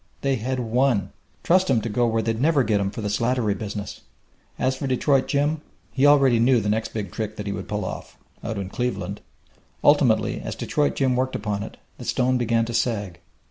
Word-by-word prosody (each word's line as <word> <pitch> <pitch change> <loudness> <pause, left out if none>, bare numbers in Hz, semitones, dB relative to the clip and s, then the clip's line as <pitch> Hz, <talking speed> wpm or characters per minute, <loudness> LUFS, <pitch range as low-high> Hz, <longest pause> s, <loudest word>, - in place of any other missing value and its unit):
They 135 -1 +1
had 130 +3 -2
won. 120 -2 +1 0.3
Trust 185 0 +3
him 125 -4 +4
to 115 - -3
go 120 +2 +1
where 115 -1 0
they'd 115 +1 -1
never 150 -2 +3
get 105 -3 +1
him 100 - 0
for 105 +3 -7
the 105 - -2
Slattery 115 +1 +1
business! 100 0 -6 0.6
As 130 0 0
for 135 +1 -4
Detroit 135 +1 +2
Jim, 145 +2 0 0.3
he 140 +1 +3
already 135 -5 +5
knew 120 +1 +4
the 105 -1 -2
next 110 +1 -1
big 105 -5 -4
trick 110 -1 -4
that 105 - -6
he 100 - -2
would - - -6
pull 105 -2 -3
off - - -7 0.3
out 110 - -3
in 100 -1 -3
Cleveland! 105 -5 -3 0.6
Ultimately, 120 -6 +3
as - - -5
Detroit 150 -1 0
Jim 130 -2 +1
worked 130 +1 -1
upon 105 -2 -2
it, - - -8 0.2
the - - -8
stone 130 0 +1
began 115 -1 +1
to 120 - -5
sag. 105 -6 -1
115 Hz, 210 wpm, -24 LUFS, 105-130 Hz, 0.6 s, already